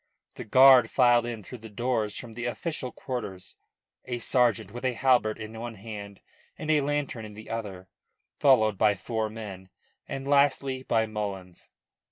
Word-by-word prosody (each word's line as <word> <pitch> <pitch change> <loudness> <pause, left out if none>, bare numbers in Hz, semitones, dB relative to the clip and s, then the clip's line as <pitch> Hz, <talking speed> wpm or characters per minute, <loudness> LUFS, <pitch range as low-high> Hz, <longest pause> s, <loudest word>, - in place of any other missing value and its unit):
The - - -8
guard 130 +3 +7
filed 120 -2 +4
in 115 -3 -5
through 125 +5 -10
the 110 +1 -11
doors 110 -1 -1
from 120 -3 -8
the 120 +2 -5
official 130 +1 -4
quarters, 105 -8 -6 0.5
a 125 -1 -3
sergeant 120 -5 +1
with 120 +3 -8
a 130 -1 +1
halbert 120 -3 +2
in 110 0 -8
one 120 0 -6
hand 100 -1 -9 0.4
and 155 0 -2
a 150 -1 +4
lantern 140 -5 -2
in 105 -1 -10
the 110 +1 -10
other, 100 -5 -5 0.5
followed 110 -8 +4
by 105 -1 +4
four 110 +3 -3
men, 100 -4 -9 0.4
and 135 0 -5
lastly 140 -2 +2
by 115 -3 +1
Mullins. 100 -4 -6
115 Hz, 165 wpm, -27 LUFS, 105-130 Hz, 0.5 s, guard